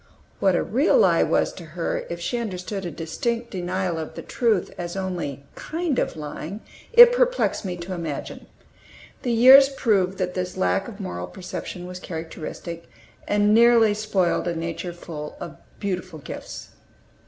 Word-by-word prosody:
What 190 Hz, -2 st, +3 dB
a -, -, +1 dB
real 275 Hz, -, +3 dB
lie -, -, +4 dB
was -, -, +1 dB
to 180 Hz, -, -10 dB
her, 170 Hz, -, -2 dB
if 170 Hz, -, -5 dB
she 240 Hz, +8 st, -2 dB
understood 190 Hz, -3 st, -4 dB
a -, -, -3 dB
distinct 230 Hz, +10 st, -3 dB
denial 180 Hz, -2 st, -2 dB
of 160 Hz, -, -6 dB
the -, -, -7 dB
truth 225 Hz, -7 st, 0 dB
as 175 Hz, 0 st, -5 dB
only 175 Hz, -8 st, -4 dB
"kind 325 Hz, -4 st, -2 dB
of" -, -, -1 dB
lying, 155 Hz, +6 st, -6 dB, 0.3 s
it 480 Hz, +1 st, +10 dB
perplexed -, -, +1 dB
me 180 Hz, -2 st, -3 dB
to 175 Hz, +2 st, -6 dB
imagine. 165 Hz, -5 st, -5 dB, 0.7 s
The 245 Hz, -, -1 dB
years 260 Hz, +4 st, +8 dB
proved 195 Hz, -8 st, +1 dB
that 180 Hz, -1 st, -2 dB
this 180 Hz, -1 st, -4 dB
lack 90 Hz, 0 st, +1 dB
of -, -, -10 dB
moral 90 Hz, 0 st, -5 dB
perception 180 Hz, -, -7 dB
was 180 Hz, 0 st, -7 dB
characteristic, 165 Hz, 0 st, -7 dB, 0.4 s
and 205 Hz, 0 st, +3 dB
nearly 230 Hz, -1 st, +6 dB
spoiled 205 Hz, -5 st, 0 dB
a 170 Hz, -, -1 dB
nature 165 Hz, +2 st, -4 dB
full 160 Hz, -3 st, -8 dB
of 160 Hz, -5 st, -8 dB, 0.2 s
beautiful 185 Hz, -4 st, -3 dB
gifts. 145 Hz, -, -8 dB
185 Hz, 160 wpm, -24 LUFS, 170-225 Hz, 0.7 s, it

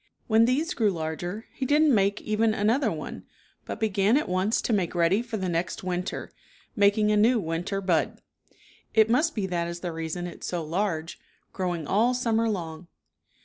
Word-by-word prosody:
When 225 Hz, 0 st, +4 dB
these 280 Hz, +7 st, +1 dB
grew 220 Hz, -3 st, +2 dB
larger 175 Hz, +4 st, -4 dB
he -, -, -5 dB
didn't 295 Hz, +2 st, +4 dB
make 200 Hz, -1 st, +2 dB
even 215 Hz, +1 st, +1 dB
another 220 Hz, +7 st, +2 dB
one, -, -, -7 dB, 0.4 s
but -, -, -6 dB
began 210 Hz, +2 st, +2 dB
at 300 Hz, -, -1 dB
once 185 Hz, +4 st, +1 dB
to 235 Hz, -, 0 dB
make 185 Hz, -4 st, 0 dB
ready 175 Hz, +5 st, +3 dB
for 235 Hz, -2 st, -5 dB
the 190 Hz, -2 st, -2 dB
next 175 Hz, +1 st, -2 dB
winter, 180 Hz, 0 st, -3 dB, 0.4 s
making 210 Hz, 0 st, +3 dB
a -, -, +3 dB
new 230 Hz, +4 st, +4 dB
win 165 Hz, -2 st, -2 dB
ter 195 Hz, +1 st, -3 dB
bud. 175 Hz, -5 st, 0 dB, 0.8 s
It 220 Hz, 0 st, +5 dB
must 305 Hz, +7 st, +2 dB
be 205 Hz, -4 st, -1 dB
that 175 Hz, -2 st, -1 dB
is 170 Hz, 0 st, -6 dB
the 175 Hz, -, -3 dB
reason 165 Hz, +2 st, -4 dB
it's 175 Hz, -, -7 dB
so 175 Hz, -2 st, -2 dB
large, 165 Hz, -1 st, -2 dB, 0.3 s
growing 175 Hz, -4 st, -2 dB
all 230 Hz, +9 st, +2 dB
summer 230 Hz, -2 st, +1 dB
long. 170 Hz, -4 st, -5 dB
200 Hz, 185 wpm, -26 LUFS, 175-225 Hz, 0.8 s, It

